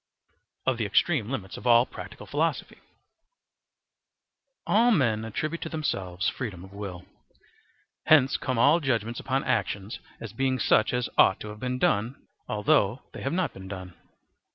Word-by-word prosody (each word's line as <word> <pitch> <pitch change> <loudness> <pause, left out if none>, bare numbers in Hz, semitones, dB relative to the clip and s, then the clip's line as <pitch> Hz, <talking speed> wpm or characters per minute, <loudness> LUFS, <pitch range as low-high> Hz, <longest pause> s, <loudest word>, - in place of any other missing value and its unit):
Of 130 -2 +1
the 110 - 0
Extreme 120 - +2
Limits 105 -8 -5
of - - -6
all 120 0 +6
Practical - - -10
Philosophy. - - -2 1.9
All 230 +4 +4
men 120 - +2
attribute 155 +9 -3
to - - -4
themselves 95 - -2
freedom 100 -9 -4
of 95 +1 -13
will. 95 -3 -7 1.0
Hence 140 -4 +5
come 130 -2 -2
all 145 +8 +5
judgements 120 -5 -1
upon 135 +1 -1
actions 100 +3 -2 0.2
as - - -8
being 130 -1 0
such 110 -2 +3
as 125 -1 -1
ought 95 - +6
to 105 - -6
have 105 0 -9
been 125 +1 -2
done, 115 +1 +1 0.3
although 115 0 +2
they - - -8
have 135 - -2
not 185 0 0
been 95 0 -10
done. 95 -2 -7
120 Hz, 155 wpm, -27 LUFS, 100-135 Hz, 1.9 s, all